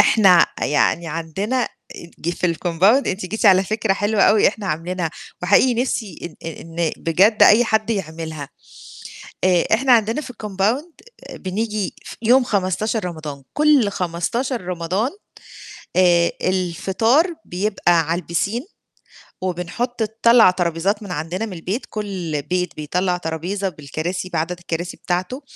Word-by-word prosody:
إحنا 190 -6 +6
ع - - -1
يعني 165 +3 +1
عندنا 180 +10 -2 0.5
ج 170 - -2
في 175 -1 -1
الCompound 180 - +2
أنتِ 185 0 -3
جيتِ 220 +4 -1
على 190 -1 +6
فكرة 215 0 0
حلوة 205 +1 +1
أوي 210 -1 +5
إحنا 205 -1 -6
عاملينها، 165 +1 -2 0.3
وحقيقي 205 +7 +4
نِفسي 220 -8 -3
إن 165 - -3
إن 165 0 -3
بجد 195 +7 +3
أي 230 +3 +7
حد 220 0 0
يعملها. 160 -7 -4 1.0
آآ 180 -2 +4
إحنا 260 +3 +3
عندنا 225 +3 +3
في 260 -4 -8
الCompound 215 - -1 0.4
بنيجي 210 +1 -3
ف - - -8
يوم 250 +3 +5
15 210 +1 -1
رمضان، 155 -5 -6
كُل 295 -7 +4
15 200 +8 -2
رمضان 180 +6 -2 0.9
آآ 175 -2 +4
الفطار 195 - +1
بيبقى 180 -2 +1
على 175 +2 0
الpiscine. 210 - -3 0.6
وبنحط 185 +7 -3
نطلَّع 225 0 +5
طرابيزات 180 +4 -1
من 195 -3 -6
عندنا 175 +8 -3
من 210 - -8
البيت، 185 +8 -4
كُل 185 -8 -4
بيت 180 +4 -2
بيطلَّع 180 +4 -1
طرابيزة 180 +4 -3
بالكراسي 155 +4 -5
بعدد 170 0 -2
الكراسي 175 0 -4
بتاعته 185 +10 -3
185 Hz, 130 wpm, -20 LUFS, 170-220 Hz, 1.0 s, أي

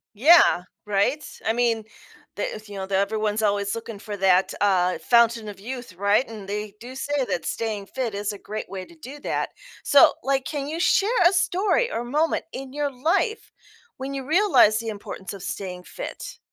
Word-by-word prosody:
Yeah. 275 - +6 0.2
Right? 210 +9 +1 0.2
I 225 - +3
mean, 230 -2 +1 0.5
the - - -3
if, 215 -1 -11
you 200 - -8
know, 190 -1 -4
that 195 - -1
everyone's 215 +1 0
always 200 0 +1
looking 225 -2 -7
for 210 -1 -6
that, 190 -1 +3
uh, 185 -3 +3
fountain 235 -2 +3
of 200 - -10
youth. 245 -1 -7
Right? 200 +6 +2
And 215 -4 -9
they 210 0 -4
do 250 +2 -9
say 285 -1 -1
that 170 - -2
staying 210 -3 -3
fit 250 -5 -3
is 205 +1 -2
a 205 - -8
great 215 -2 -6
way 190 -1 -6
to 340 - -17
do 290 -2 -10
that. - - -2 0.3
So, 285 - +6
like, 270 0 0
can 285 -2 -3
you 320 +2 -4
share 400 +4 +3 0.2
a 380 - +2
story 380 +7 +1
or 235 - -2
moment 300 +6 0
in 265 0 -7
your 290 -1 -1
life 330 - 0 0.5
when 270 +1 -5
you 270 -1 -4
realized 290 - +4
the 230 - -6
importance 200 -2 -7
of 195 -2 -9
staying 180 -2 -5
fit? - - -8
230 Hz, 190 wpm, -24 LUFS, 200-275 Hz, 0.5 s, Yeah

